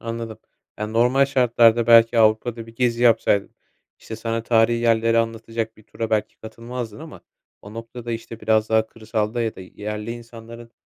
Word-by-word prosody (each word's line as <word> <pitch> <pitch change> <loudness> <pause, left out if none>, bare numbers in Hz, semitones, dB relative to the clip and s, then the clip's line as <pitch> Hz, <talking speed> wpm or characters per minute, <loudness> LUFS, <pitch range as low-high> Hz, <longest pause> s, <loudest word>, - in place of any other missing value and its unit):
Anladım. 115 -1 -6 0.4
Ya, 105 - -2
normal 120 +5 +3
şartlarda, 120 -4 +3
belki 115 0 +6
Avrupa'da 115 +1 +2
bir 115 - -14
gezi 120 -1 0
yapsaydın, 115 -4 +2 0.4
işte, 110 - -8
sana 115 0 -3
tarihî 115 0 +2
yerleri 115 0 +2
anlatacak 115 0 -3
bir 110 - -18
tura 110 +1 -6
belki 110 -1 -1
katılmazdın 115 0 -8
ama 160 -1 -11 0.4
o 105 +2 -12
noktada, 115 +1 -7
işte, 115 0 -7
biraz 110 0 +1
daha 110 0 +2
kırsalda 110 +1 -3
ya 110 -1 -2
da - - -10
yerli 105 +4 -6
insanların 115 0 -10
115 Hz, 160 wpm, -22 LUFS, 110-115 Hz, 0.4 s, belki